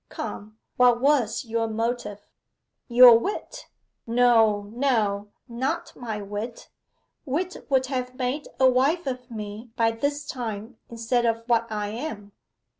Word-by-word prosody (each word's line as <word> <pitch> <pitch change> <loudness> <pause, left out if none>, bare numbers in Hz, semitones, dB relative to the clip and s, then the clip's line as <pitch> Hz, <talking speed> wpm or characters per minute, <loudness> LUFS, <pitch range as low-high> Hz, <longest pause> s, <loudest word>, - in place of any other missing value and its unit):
Come, 215 +1 -7 0.2
what 245 -1 +5
was 265 -4 +2
your 225 0 -1
motive?' 225 -2 -3 0.6
'Your 240 -1 +8
wit.' 400 - -5 0.4
'No, 230 -3 +4
no; 220 -6 0 0.2
not 245 +2 -3
my 220 -4 -5
wit. 210 +4 -6 0.5
Wit 340 +6 -3
would 265 -2 +3
have 255 -1 -4
made 260 +3 -2
a 260 - +6
wife 275 +8 +2
of 250 -2 -5
me 215 +1 -7
by 225 -1 +2
this 285 +6 -2
time 225 -2 -6
instead 235 +1 0
of 230 0 -1
what 230 -1 +1
I 210 -1 -2
am. 215 -3 -6
235 Hz, 130 wpm, -25 LUFS, 220-255 Hz, 0.6 s, Your